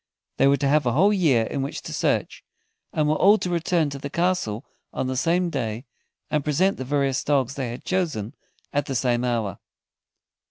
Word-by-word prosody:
They - - +4
were 140 0 +4
to 140 - 0
have 145 -1 +3
a 120 - +2
whole 195 - +4
year 150 - +3
in 135 - -3
which 135 - -4
to - - -6
search, - - -1 0.5
and 155 -1 +1
were 150 - +3
all 205 +3 +6
to 180 - -3
return 170 -3 +1
to 140 - -6
the 140 - -5
castle 160 - -1 0.3
on - - -2
the 130 0 -2
same 170 +6 +1
day, 115 -3 -3 0.5
and 150 -2 +1
present 175 +7 +1
the 130 - -4
various 140 0 0
dogs 135 -3 +1
they 135 -3 -3
had 120 +2 -8
chosen 155 - -1 0.4
at 145 -1 0
the 135 - -3
same 120 -1 +1
hour. 115 -6 -1
140 Hz, 200 wpm, -24 LUFS, 125-165 Hz, 0.5 s, all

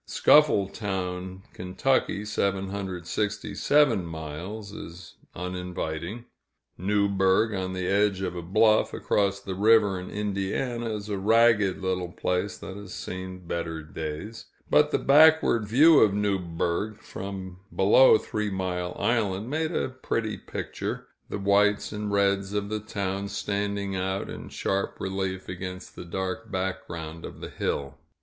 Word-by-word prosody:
Scuffletown, 95 -8 +2
Ky. 100 +3 0
(767 100 - 0
miles), 85 +6 -6
is 85 -3 -10 0.2
uninviting. 90 +3 -4 0.5
Newburgh, 100 +2 +2
on 95 -1 -2
the 90 -1 -3
edge 100 0 +2
of 90 - -3
a 85 - -4
bluff, 110 +5 +3
across 100 -1 +1
the 100 -1 -5
river 105 -1 +4
in 90 - -7
Indiana, 105 +4 -2
is 105 0 -6
a 100 -2 -2
ragged 105 -2 +4
little 90 -1 -1
place 90 +3 -1
that 95 - -8
has 100 -3 -8
seen 90 0 -6
better 80 -2 -3
days; 80 +8 -6 0.2
but - - +5
the - - +2
backward 150 -6 +5
view 150 +8 +7
of 100 -2 +4
Newburgh, 95 0 -1
from 95 -1 -7 0.2
below 110 +5 +7
Three 105 -1 -3
Mile 90 -2 -3
Island, 105 0 0
made 160 +1 0
a 160 - -1
pretty 115 -4 -2
picture, - - -5 0.2
the - - -3
whites 100 +1 +2
and 105 -1 -3
reds 100 0 +1
of 100 0 -1
the 110 0 -2
town 100 -2 -3
standing 100 -1 -2
out 95 +1 -2
in - - -8
sharp 100 0 -2
relief 95 -1 -3
against 90 0 -7
the 90 - -8
dark 95 +2 -4
background 85 -4 -4
of - - -8
the - - -7
hill. 70 -1 -3
100 Hz, 130 wpm, -27 LUFS, 90-105 Hz, 0.5 s, view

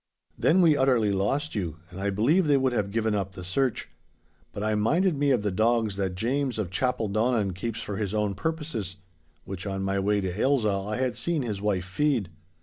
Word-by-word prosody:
'Then 180 +3 +4
we 160 -3 +6
utterly 125 -7 +3
lost 135 +11 0
you, 85 -7 -3
and 90 - -8
I 100 - 0
believe 140 - +2
they 145 -1 +5
would 130 -2 +1
have 105 -4 0
given 110 +1 0
up 100 -2 -2
the 90 - -8
search. 120 +7 -1 0.6
But 100 - -5
I 110 0 +1
minded 160 - +2
me 145 0 +1
of 125 -6 +2
the 105 - 0
dogs 110 +1 +1
that 95 -2 -1
James 130 +5 -1
of 100 -5 -3
Chapeldonnan 110 -2 0
keeps 115 +5 -4
for 105 -3 -4
his 100 -2 -2
own 105 -1 0
purposes, 125 - -3 0.5
which 95 +1 -6
on 95 0 -2
my 95 0 0
way 100 +1 +2
to 95 -2 -3
Ailsa 130 -5 +2
I 100 +2 -2
had 130 0 -1
seen 170 -5 -1
his 105 -5 -4
wife 100 -3 0
feed. 110 - 0
110 Hz, 205 wpm, -27 LUFS, 100-130 Hz, 0.6 s, we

